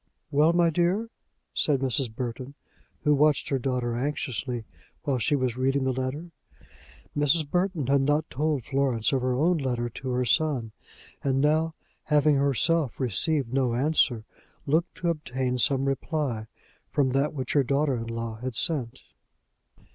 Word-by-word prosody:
"Well, 150 +3 +4
my 170 -1 +3
dear," 180 +8 0 0.4
said 145 -3 +1
Mrs. 130 -3 -1
Burton, 125 +3 -5 0.5
who 150 - +4
watched 145 0 +3
her 135 - 0
daughter 125 -2 -1
anxiously 125 -4 -3 0.4
while 140 -4 0
she 145 +6 +2
was 130 -3 -1
reading 135 +1 +1
the 130 0 0
letter. 130 +7 -4 0.8
Mrs. 145 +1 +2
Burton 180 -2 0
had 140 +2 +3
not 145 +3 +1
told 150 -2 -1
Florence 135 -3 0
of 135 - +1
her 125 0 0
own 165 +5 +2
letter 120 -3 -1
to 130 +3 -7
her 125 0 0
son; 130 -5 +1 0.5
and 135 -1 +1
now, 155 +3 +2 0.3
having 150 -1 +3
herself 140 +1 +1
received 130 - +1
no 130 -3 +1
answer, 130 -4 +2 0.4
looked 160 +5 0
to 175 -1 -1
obtain 130 -5 -2
some 135 +2 +2
reply 135 -5 -2 0.4
from 140 -3 +1
that 140 +4 0
which 130 -3 -3
her 145 - +4
daughter 140 +1 +1
in 115 0 -5
law 115 -1 -4
had 125 +1 -5
sent. 130 -4 +2
135 Hz, 155 wpm, -26 LUFS, 125-150 Hz, 0.8 s, Well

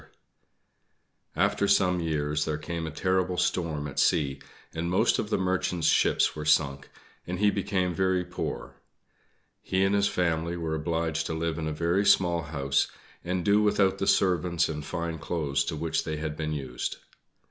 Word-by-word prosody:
After 100 - +2
some 90 -2 +3
years 75 -2 -1
there 75 -1 -2
came 80 +1 -4
a - - -3
terrible 95 +2 0
storm 80 -6 -1
at 70 - -4
sea, 70 -4 +2 0.3
and 85 +1 -2
most 90 - +2
of 105 - -2
the - - +1
Merchant's 90 -2 -1
ships - - +3
were 75 - -5
sunk, 70 -3 +1 0.4
and 90 +1 -3
he 105 +2 +3
became 95 -3 -1
very 95 0 +1
poor. 90 - -6 0.8
He 95 +1 0
and 95 - +1
his 100 0 +3
family 85 -1 -1
were 80 -2 -3
obliged 80 0 -1
to 80 - -3
live 80 0 -2
in 80 - -3
a - - -1
very 85 +5 +1
small 85 -4 +3
house 70 -3 0 0.4
and 90 0 -2
do 105 +1 +4
without 100 -2 +2
the 95 - -1
servants 90 -2 +2
and 75 -1 -5
fine 85 +1 -4
clothes 70 -4 -1
to 80 - -3
which 80 +1 -1
they 80 -1 -3
had 75 0 -4
been 75 0 -3
used. 65 -4 -4
85 Hz, 170 wpm, -27 LUFS, 75-90 Hz, 0.8 s, do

